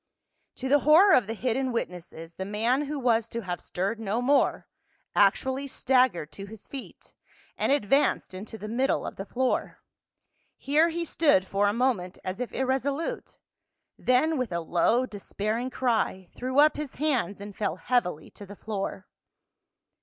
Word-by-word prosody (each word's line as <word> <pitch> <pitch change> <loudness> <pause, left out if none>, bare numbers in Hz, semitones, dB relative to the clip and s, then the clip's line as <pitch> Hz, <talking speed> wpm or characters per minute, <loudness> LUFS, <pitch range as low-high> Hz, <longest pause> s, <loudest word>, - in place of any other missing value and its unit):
To 265 - -4
the 290 +2 +5
horror 325 +8 +6
of 235 -6 +4
the 225 - -3
hidden 255 +3 -1
witnesses, 175 -6 -5
the 190 - -5
man 230 +8 0
who 295 +1 -4
was 230 -4 +1
to 235 - -4
have 180 -4 -5
stirred 195 +5 -3
no 220 +1 -1
more 275 +3 +2 0.5
actually 260 +7 +2
staggered 250 - +1
to 195 +4 -8
his 215 0 -12
feet 275 -2 -10 0.4
and - - 0
advanced 275 -4 +2
into 205 +4 -8
the 210 - -7
middle 255 +5 0
of - - -6
the 195 - -6
floor; 255 +1 -1 0.8
here 305 +4 +3
he 335 +1 -3
stood 290 - +3
for 200 +1 +1
a - - +3
moment 220 -6 0
as 185 +4 -4
if 250 - -3
irresolute, 270 +4 -2 0.6
then 280 +4 +2
with 255 -5 -2
a 170 - -1
low 220 +10 +2
despairing 215 +2 -3
cry 225 -8 -1
threw 255 +2 -3
up 300 +1 +6
his 295 -3 -5
hands 255 -9 0
and 200 0 -9
fell 205 -6 -1
heavily 180 -8 -1
to 205 - -12
the 205 - -10
floor. 195 -2 -5
235 Hz, 160 wpm, -27 LUFS, 200-265 Hz, 0.8 s, horror